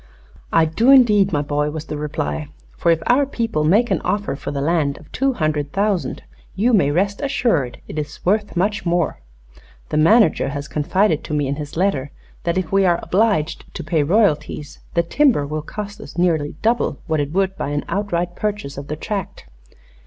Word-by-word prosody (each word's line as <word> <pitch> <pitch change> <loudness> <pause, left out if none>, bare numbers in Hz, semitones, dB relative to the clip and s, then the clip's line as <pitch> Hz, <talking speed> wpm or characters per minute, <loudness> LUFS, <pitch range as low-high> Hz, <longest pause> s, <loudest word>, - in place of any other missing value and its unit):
"I 165 -1 +4
do, 220 +11 +1
indeed, 215 -8 +6
my 145 -3 0
boy," 150 +1 0
was 155 +1 -6
the 150 - -5
reply. 150 0 -3 0.3
"For 170 - 0
if 165 0 +1
our 270 +3 +3
people 230 - -1
make 210 +10 +3
an - - +1
offer 205 -7 -1
for - - -6
the 140 - -3
land 145 -1 +1
of 155 - -16
two 270 +1 +1
hundred 155 - -1
thousand 195 -8 -1 0.3
you 230 +6 +2
may 165 -10 +4
rest 195 +6 0
assured 230 - 0
it 155 - -4
is 150 0 -7
worth 205 0 +1
much 205 +4 0
more. 170 - 0 0.7
The - - -1
manager 165 - +4
has 145 +1 -5
confided 170 +2 +1
to 150 - -3
me 145 -1 +1
in 140 +1 -2
his 150 0 -7
letter 155 -7 0 0.4
that 170 +1 0
if 185 -4 -2
we 195 0 +4
are 175 -2 +3
obliged 185 -6 0
to - - -5
pay 155 +1 +1
royalties 150 -4 0 0.2
the 170 - +3
timber 245 - +2
will 155 +2 -3
cost 205 +6 -7
us - - -11
nearly 160 -5 +1
double 235 +2 +1
what 160 -3 0
it 145 0 -2
would 190 +2 0
by - - -3
an 145 0 -2
outright 175 -3 -2
purchase 205 -10 -3
of 140 - -9
the 150 - -3
tract." 195 +4 -5
170 Hz, 195 wpm, -20 LUFS, 150-205 Hz, 0.7 s, indeed